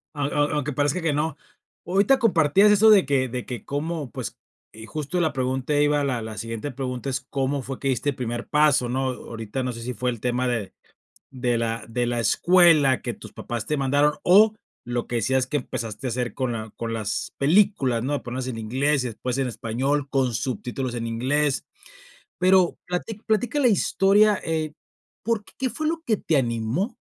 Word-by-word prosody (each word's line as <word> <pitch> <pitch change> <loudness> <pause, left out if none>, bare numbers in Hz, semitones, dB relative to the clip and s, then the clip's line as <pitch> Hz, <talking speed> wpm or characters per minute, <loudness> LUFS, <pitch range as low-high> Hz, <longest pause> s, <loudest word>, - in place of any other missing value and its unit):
Au 145 -1 -1
au 145 0 +2
aunque 150 -1 -1
parezca 145 +5 0
que 160 -2 +1
no. 150 +2 -1 0.5
Ahorita 200 +9 +3
compartías 195 - +4
eso 215 +2 +6
de 200 -3 +6
que 135 -3 +1
de 125 0 -5
que 120 -4 -6
cómo, 150 -1 -3
pues - - -6 0.4
eh, 110 0 -10
justo 155 +6 -3
la 160 -4 +1
pregunta 130 +2 -1
iba 145 0 +3
la 125 -4 -1
la 110 -1 -7
siguiente 115 +5 -4
pregunta 130 0 -4
es, 130 +1 -2
¿cómo 135 +1 -1
fue 135 +1 -6
que 135 - -3
diste 130 +2 0
el 135 - -9
primer 120 -1 -4
paso, 150 -5 +3
no? 130 +1 0
Ahorita 115 0 -5
no 125 - -2
sé 115 0 -8
si 125 +2 -4
fue 125 -1 -1
el 120 - -7
tema 125 +1 0
de 115 -6 -2 0.6
de 125 -2 -1
la 115 0 -2
de 120 +1 -1
la 120 -1 -1
escuela 165 -2 +4
que 120 - -3
tus - - -12
papás 120 -2 -5
te 150 - 0
mandaron 145 +2 +2
o 210 +4 +6 0.3
lo 120 0 -3
que 120 - -3
decías 130 +3 +1
que 150 - -1
empezaste 120 -1 -5
a - - -1
hacer 120 -2 -2
con 130 -2 -1
la 110 -1 -5
con 115 -1 -4
las 110 -2 -3
películas, 145 - +3
¿no?, 135 +4 -2
de 145 - -1
ponerlas 130 +1 -5
en 115 - -4
inglés 130 +5 0
y - - -1
después 120 +2 -4
en 135 -2 0
español, 130 +6 -1
con 130 -4 +1
subtítulos 125 +1 -3
en 115 -1 -3
inglés, 135 +5 0 0.7
pero 185 -1 +4
plati 180 +5 -3
platica 220 +5 +1
la 250 - +5
historia, 205 0 +3
eh, 155 -2 -2 0.5
por 225 -2 0
¿qué 260 +3 -4
fue 310 - -3
lo 325 0 -2
que 220 - +2
te 160 - 0
animó 125 - -1
135 Hz, 200 wpm, -24 LUFS, 120-160 Hz, 0.7 s, eso